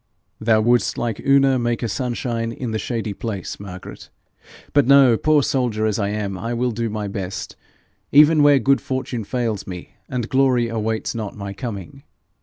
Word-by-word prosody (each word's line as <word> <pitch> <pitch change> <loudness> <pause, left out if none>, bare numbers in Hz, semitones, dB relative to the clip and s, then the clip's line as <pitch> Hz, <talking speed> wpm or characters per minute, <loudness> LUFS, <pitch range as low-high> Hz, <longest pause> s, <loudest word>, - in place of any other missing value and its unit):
'Thou 110 0 +3
wouldst 120 +2 +2
like 115 -3 -2
Una 135 -1 +3
make 120 0 -1
a - - 0
sunshine 115 +1 -2
in 115 0 -5
the 110 - -2
shady 115 -3 -3
place, 100 -4 -5
Margaret. 95 -2 -10 0.6
But 145 -3 +4
no. 135 -3 +7
Poor 150 +4 +3
soldier 120 -6 0
as 110 -1 0
I 100 -1 0
am, 100 -2 -3
I 115 +3 -3
will 125 +1 0
do 115 0 -2
my 105 -1 -3
best, 95 -1 -5 0.6
even 150 +2 +6
where 145 -1 +6
good 135 +2 +2
fortune 130 -3 -3
fails 115 -2 -3
me, 90 -2 -8 0.2
and 125 -4 -2
glory 130 -3 +2
awaits 110 -1 -2
not 110 -4 -5
my 100 -1 -6
coming. 115 +1 -7
115 Hz, 175 wpm, -21 LUFS, 105-130 Hz, 0.6 s, no